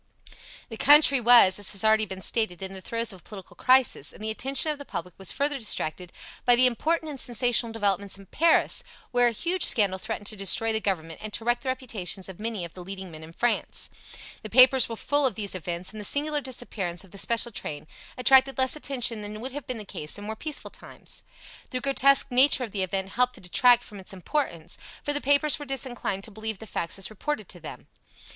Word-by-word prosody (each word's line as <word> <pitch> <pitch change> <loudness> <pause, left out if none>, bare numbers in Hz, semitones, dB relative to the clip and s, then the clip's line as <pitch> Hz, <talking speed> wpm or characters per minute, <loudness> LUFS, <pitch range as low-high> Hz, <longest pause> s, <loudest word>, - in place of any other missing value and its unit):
The 225 - -8
country 280 -1 +6
was, 235 -5 +7
as 205 - -1
has 195 - -4
already 220 0 +3
been 190 0 -6
stated, 215 -6 -1
in 190 0 -6
the 190 - -9
throes 230 +2 -2
of 190 - -13
a - - -21
political 190 -4 -12
crisis, 255 +2 +2
and - - -12
the 220 - -1
attention 270 +7 +1
of 295 - -6
the - - -7
public 180 -8 -7
was 195 - +2
further 285 0 -1
distracted 180 -5 -2 0.3
by 245 - +5
the 255 +1 +5
important 315 +6 0
and 275 - -7
sensational 240 -1 +1
developments 200 -3 0
in 195 - -14
Paris, 330 - +2 0.3
where 245 -1 +4
a - - +1
huge 345 - -1
scandal 195 -4 +4
threatened 220 0 -5
to 215 - -4
destroy 215 +3 0
the 220 - -1
Government 165 -6 -3
and 215 - -6
to 225 - -3
wreck 240 0 +1
the 265 - -5
reputations 220 -8 -4
of 190 -1 -11
many 215 -4 -4
of 170 - -12
the 185 - -10
leading 190 -1 -8
men 155 0 -11
in 160 - -11
France. 240 +8 -2 0.5
The 215 - -8
papers 255 +2 +6
were 230 - -5
full 290 +5 +1
of 235 - -3
these 205 -3 -4
events, 175 0 -5
and 215 -1 -8
the - - -7
singular 295 +6 +1
disappearance 215 -9 -4
of 190 - -19
the 200 - -6
special 235 +4 +2
train 150 -8 -7 0.3
attracted 265 +1 +4
less 260 +1 +2
attention 245 -7 0
than 210 +1 -7
would 255 +4 -7
have 285 0 -8
been 255 - -4
the 215 - -8
case 155 -3 -4
in 205 - -9
more 220 +1 -5
peaceful 300 +6 -5
times. - - -9 0.5
The 255 - -3
grotesque 275 0 +3
nature 260 +1 +5
of 225 - -6
the 195 - -3
event 190 +1 -3
helped 250 +4 0
to - - -10
detract 240 +6 +4
from 205 -3 -11
its 190 - -7
importance, 185 - -4 0.2
for 290 - 0
the 290 - 0
papers 285 +2 +3
were 290 - -7
disinclined 245 -7 -4
to 220 - -7
believe 220 0 -5
the 220 - -9
facts 170 -4 -4
as 195 +2 -3
reported 215 -1 -4
to 175 - -9
them. 155 - -10
225 Hz, 225 wpm, -26 LUFS, 195-260 Hz, 0.5 s, was